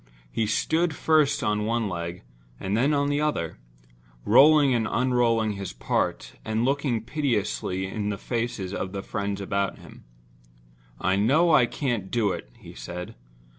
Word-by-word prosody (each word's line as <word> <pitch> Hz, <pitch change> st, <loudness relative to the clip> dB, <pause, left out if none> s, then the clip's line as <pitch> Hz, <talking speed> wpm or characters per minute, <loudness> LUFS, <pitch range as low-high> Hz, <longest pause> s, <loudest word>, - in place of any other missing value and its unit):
He 110 Hz, -, 0 dB
stood 160 Hz, +9 st, +1 dB
first 155 Hz, -3 st, +2 dB
on 105 Hz, 0 st, 0 dB
one 115 Hz, -1 st, 0 dB
leg 85 Hz, -1 st, -5 dB, 0.4 s
and 95 Hz, +2 st, -2 dB
then 130 Hz, +6 st, +2 dB
on 145 Hz, -1 st, +1 dB
the 145 Hz, +1 st, 0 dB
other; 85 Hz, -, -2 dB, 0.7 s
rolling 140 Hz, +4 st, +6 dB
and 115 Hz, -2 st, +1 dB
unrolling 120 Hz, -3 st, +2 dB
his 100 Hz, -7 st, -6 dB
part, -, -, -2 dB
and 110 Hz, +2 st, -1 dB
looking 135 Hz, -4 st, 0 dB
piteously 110 Hz, -8 st, -1 dB
in 105 Hz, +2 st, -3 dB
the 100 Hz, -, -2 dB
faces 115 Hz, -6 st, -3 dB
of 95 Hz, -1 st, -4 dB
the 100 Hz, -1 st, -4 dB
friends 100 Hz, -1 st, -3 dB
about 100 Hz, 0 st, -1 dB
him. -, -, -14 dB, 1.0 s
"I 95 Hz, +1 st, +1 dB
know 150 Hz, +12 st, +4 dB
I 125 Hz, -5 st, +6 dB
can't 120 Hz, -8 st, -2 dB
do 110 Hz, -4 st, +1 dB
it," 60 Hz, -, -6 dB
he -, -, -12 dB
said. 85 Hz, +9 st, -7 dB
110 Hz, 155 wpm, -26 LUFS, 100-135 Hz, 1.0 s, rolling